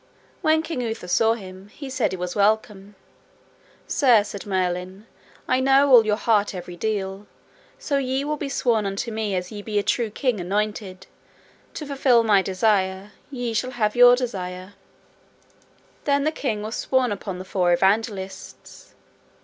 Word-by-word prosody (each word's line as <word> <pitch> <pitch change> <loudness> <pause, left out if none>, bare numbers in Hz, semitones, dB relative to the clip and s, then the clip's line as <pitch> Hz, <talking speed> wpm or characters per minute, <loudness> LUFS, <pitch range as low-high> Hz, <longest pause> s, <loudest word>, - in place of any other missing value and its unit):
When 315 -2 +2
King 320 -6 -4
Uther 225 -6 -4
saw 225 +5 +3
him, 190 -2 -11
he 275 +7 -10
said 260 -3 -1
he 190 - -4
was 180 0 -4
welcome. 205 -1 0 0.9
Sir, 245 -7 +4
said 205 -1 -8
Merlin, 185 +1 -2 0.4
I 255 - +2
know 270 +1 +4
all 230 -4 +7
your 210 - +2
heart 210 -3 +1
every 180 -1 -7
deal; 195 0 -3 0.5
so 280 -2 -1
ye 265 +1 -1
will 300 +1 -1
be 290 -1 -5
sworn 230 -6 +1
unto 200 +5 -3
me 215 -3 -2
as 180 0 -4
ye 205 -1 -7
be 210 0 -3
a 205 - +2
true 235 +1 0
king 245 0 -1
anointed, 195 0 -3 0.7
to 305 - -5
fulfil 265 -4 +3
my 205 -3 +4
desire, 190 0 0 0.2
ye 245 -4 -4
shall 255 +3 -1
have 210 -1 +1
your 245 0 +8
desire. 185 -6 -5 1.3
Then 280 -1 +2
the 310 - +1
king 225 -9 -3
was 220 +2 -5
sworn 260 -3 +1
upon 195 -2 -5
the 185 - -8
Four 180 -2 +1
Evangelists. 195 +1 -2
215 Hz, 160 wpm, -23 LUFS, 190-245 Hz, 1.3 s, your